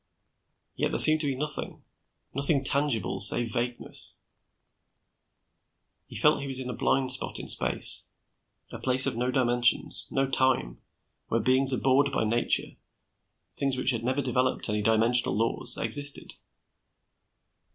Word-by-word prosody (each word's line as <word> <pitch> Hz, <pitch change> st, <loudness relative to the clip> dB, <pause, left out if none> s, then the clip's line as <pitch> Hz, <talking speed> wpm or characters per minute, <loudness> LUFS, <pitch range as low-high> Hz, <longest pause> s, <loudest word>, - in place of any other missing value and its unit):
Yet -, -, -3 dB
there -, -, -5 dB
seemed 155 Hz, 0 st, +9 dB
to 150 Hz, -, -4 dB
be 135 Hz, -, -4 dB
nothing, 150 Hz, +2 st, -7 dB, 0.5 s
nothing 140 Hz, +1 st, +1 dB
tangible 135 Hz, -8 st, -2 dB
save 115 Hz, +3 st, 0 dB
vagueness. 120 Hz, 0 st, -4 dB, 1.9 s
He -, -, -15 dB
felt -, -, 0 dB
he 140 Hz, -, -8 dB
was 135 Hz, -1 st, +6 dB
in 125 Hz, -1 st, -6 dB
a -, -, -8 dB
blind 130 Hz, +1 st, -2 dB
spot 130 Hz, -, +4 dB
in -, -, -9 dB
space, -, -, +1 dB, 0.6 s
a -, -, -11 dB
place 130 Hz, 0 st, +7 dB
of -, -, -2 dB
no 125 Hz, +2 st, -4 dB
dimensions, 120 Hz, -2 st, -1 dB
no 135 Hz, 0 st, -3 dB
time, 130 Hz, -, -2 dB, 0.5 s
where 115 Hz, -, -3 dB
beings 130 Hz, +4 st, +4 dB
abhorred 135 Hz, +2 st, 0 dB
by 130 Hz, -, -3 dB
nature, 115 Hz, +2 st, -3 dB, 0.8 s
things 135 Hz, -2 st, -3 dB
which 130 Hz, -, -1 dB
had 115 Hz, -2 st, -6 dB
never 130 Hz, +3 st, -4 dB
developed 130 Hz, -3 st, -3 dB
any 105 Hz, 0 st, -4 dB
dimensional 115 Hz, +1 st, +1 dB
laws, 115 Hz, +1 st, -3 dB
existed. 145 Hz, +5 st, -1 dB
130 Hz, 140 wpm, -24 LUFS, 120-135 Hz, 1.9 s, seemed